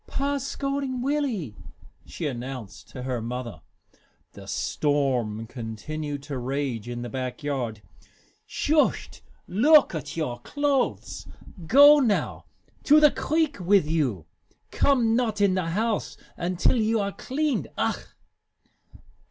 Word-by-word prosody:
"Pa's 280 Hz, -1 st, -2 dB
scolding 275 Hz, -3 st, -3 dB
Willie," 255 Hz, -, -1 dB, 0.5 s
she 165 Hz, -, -6 dB
announced 120 Hz, -8 st, -6 dB
to 125 Hz, -, -8 dB
her 125 Hz, -2 st, -2 dB
mother. 120 Hz, 0 st, -5 dB, 0.7 s
The -, -, -12 dB
storm 130 Hz, -7 st, -1 dB
continued 140 Hz, +6 st, -6 dB
to 140 Hz, -2 st, -5 dB
rage 130 Hz, -3 st, -3 dB
in 120 Hz, 0 st, -5 dB
the -, -, -4 dB
back 130 Hz, +4 st, -5 dB
yard. 120 Hz, -7 st, -3 dB, 0.6 s
"Shust 305 Hz, 0 st, 0 dB, 0.3 s
look 290 Hz, -, +5 dB
at 160 Hz, 0 st, -6 dB
your 125 Hz, -7 st, -2 dB
clothes! 285 Hz, -, -1 dB, 0.4 s
Go 285 Hz, -, +8 dB
now! 230 Hz, -7 st, 0 dB, 0.4 s
To 300 Hz, +1 st, +7 dB
the 300 Hz, -2 st, +6 dB
creek 310 Hz, -1 st, 0 dB
wit' 185 Hz, 0 st, +3 dB
you! 140 Hz, -, -1 dB, 0.5 s
Come 240 Hz, -5 st, +2 dB
not 225 Hz, -4 st, 0 dB
in 200 Hz, -2 st, +3 dB
the 185 Hz, -3 st, -1 dB
house 220 Hz, +5 st, -1 dB, 0.2 s
until 180 Hz, +7 st, +1 dB
you 220 Hz, 0 st, +1 dB
are 200 Hz, -1 st, -1 dB
cleaned. 290 Hz, +6 st, -2 dB
Ach!" -, -, -1 dB
165 Hz, 120 wpm, -25 LUFS, -, 0.7 s, Go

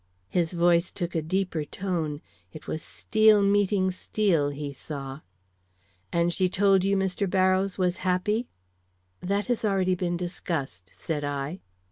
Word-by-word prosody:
His 175 Hz, -1 st, 0 dB
voice 170 Hz, 0 st, +3 dB
took 175 Hz, -2 st, -4 dB
a 160 Hz, -, 0 dB
deeper 175 Hz, -1 st, -1 dB
tone; 160 Hz, -3 st, -3 dB, 0.3 s
it 155 Hz, -, -11 dB
was 155 Hz, -, -4 dB
steel 215 Hz, +2 st, +3 dB
meeting 200 Hz, -1 st, +2 dB
steel, 180 Hz, -5 st, +1 dB
he 145 Hz, 0 st, -5 dB
saw. 135 Hz, -1 st, -6 dB, 0.9 s
"And 170 Hz, 0 st, +1 dB
she 185 Hz, 0 st, +2 dB
told 195 Hz, 0 st, +3 dB
you 195 Hz, +1 st, +2 dB
Mr. 190 Hz, 0 st, 0 dB
Barrows 185 Hz, 0 st, +2 dB
was 180 Hz, -1 st, +1 dB
happy?" 195 Hz, +6 st, 0 dB, 0.7 s
"That 200 Hz, +3 st, -1 dB
has 245 Hz, -2 st, -1 dB
been 215 Hz, -, +1 dB
already 185 Hz, -1 st, +2 dB
discussed," 170 Hz, -, -3 dB
said 150 Hz, -3 st, -3 dB
I. 145 Hz, +4 st, -3 dB
180 Hz, 140 wpm, -27 LUFS, 160-195 Hz, 0.9 s, voice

